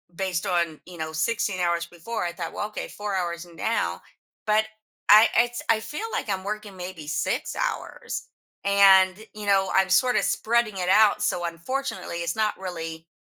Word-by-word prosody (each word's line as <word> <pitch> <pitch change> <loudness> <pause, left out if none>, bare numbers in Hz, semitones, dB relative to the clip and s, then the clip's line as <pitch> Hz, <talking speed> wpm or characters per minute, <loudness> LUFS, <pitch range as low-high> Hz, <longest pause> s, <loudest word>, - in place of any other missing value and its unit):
based 185 0 -2
on, 170 -4 0
you 180 -1 -11
know, 160 -1 -4
16 195 +4 -1
hours 170 -1 +1
before, 175 +7 -5
I 175 - -1
thought, 170 -1 -5
"Well, 210 - -3
okay, 215 - -6
4 205 -1 -4
hours 170 -2 -2
now" 225 +7 -1 0.4
But 215 0 +3 0.4
I 215 +2 +9
it's 240 0 +1
I 225 -1 +4
feel, 300 - -5
like, - - -3
I'm 190 -1 -1
working 210 -1 -5
maybe 180 -4 -7
6 155 - -1
hours. - - -4 0.4
And, 195 -2 +6 0.2
you 210 -1 -7
know, 195 -1 +3
I'm 190 0 +3
sort 245 +7 +4
of - - +3
spreading 230 -2 +1
it 180 -1 -2
out, 210 +1 +5
so 175 - 0
unfortunately, 180 - -4
it's 170 +2 -2
not 215 -1 0
really 165 -3 -6
190 Hz, 175 wpm, -25 LUFS, 170-215 Hz, 0.4 s, I